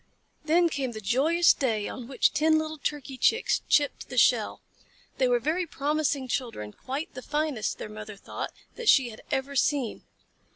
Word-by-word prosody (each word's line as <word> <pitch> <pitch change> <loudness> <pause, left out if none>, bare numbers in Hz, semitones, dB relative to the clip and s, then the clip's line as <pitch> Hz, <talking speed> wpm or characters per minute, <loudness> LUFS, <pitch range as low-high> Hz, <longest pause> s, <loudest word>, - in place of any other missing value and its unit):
Then 340 +3 +4
came 270 -6 -3
the 215 - -6
joyous 280 - +4
day 220 -6 -1
on 250 -3 -7
which 270 - +2
ten 315 +2 +3
little 315 0 -3
Turkey 275 -3 -4
Chicks 450 - +2
chipped 290 -1 +2
the - - -6
shell. - - +3 0.6
They 260 - +4
were 245 -1 +3
very 320 +8 -1
promising 290 -2 -1
children, 230 - -3
quite 275 +5 -5
the 255 - -7
finest, 295 -7 -2
their - - -6
mother 215 0 -8
thought, 195 - -6 0.3
that 475 -2 0
she 255 -4 +5
had 215 - -12
ever 270 +1 -1
seen. 270 -3 +1
275 Hz, 170 wpm, -27 LUFS, 240-310 Hz, 0.6 s, she